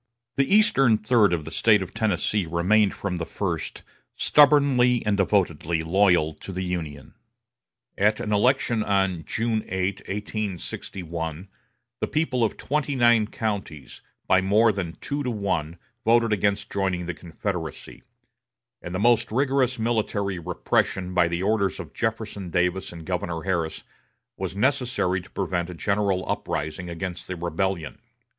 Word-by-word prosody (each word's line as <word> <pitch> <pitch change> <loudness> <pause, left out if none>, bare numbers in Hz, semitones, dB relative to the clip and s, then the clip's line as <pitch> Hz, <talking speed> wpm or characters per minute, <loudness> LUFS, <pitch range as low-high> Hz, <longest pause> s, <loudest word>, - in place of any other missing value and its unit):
The 135 +4 +1
eastern 135 - +5
third 105 -3 +3
of 80 -3 -1
the 80 - -7
State 105 +1 +4
of 95 - -10
Tennessee 105 -3 0
remained 95 +5 +2
from 90 -3 -3
the 85 - -3
first - - -4 0.3
stubbornly 140 -4 +4
and 105 -1 +2
devotedly 85 -5 +1
loyal 90 -2 +3
to 75 +5 -9
the 95 0 -3
Union. 80 -6 -5 0.9
At 105 +2 +3
an 105 - -2
election 120 +1 +2
on 95 -5 +1
June 110 -1 -1
8, 95 +1 -1
1861, 90 -4 -5 0.5
the - - -1
people 135 -6 0
of 110 - 0
twenty 145 0 -1
nine 120 -3 +4
counties, 100 - -5 0.2
by 95 - +4
more 105 +4 +4
than 95 -5 -4
two 145 0 -3
to 130 - -2
one, 95 -7 -2 0.3
voted 115 -1 +3
against 100 0 0
joining 95 -3 -1
the 90 - -3
Confederacy; 85 0 -6 0.8
and 85 - -6
the - - -1
most 120 +1 +3
rigorous 130 0 +1
military 105 -4 -1
repression 90 +2 -1
by 90 -2 +4
the 85 +2 -2
orders 100 -2 +1
of - - -8
Jefferson 110 -4 -3
Davis 90 +2 0
and 85 -2 -10
Governor 85 -2 -3
Harris 85 -4 -2 0.5
was - - -4
necessary 120 -6 +1
to 90 - -16
prevent 90 -2 -2
a 90 - -7
general 100 0 0
uprising 80 +4 -3
against 85 +1 -5
the 95 - -4
rebellion. 85 -2 -2
100 Hz, 145 wpm, -25 LUFS, 90-110 Hz, 0.9 s, eastern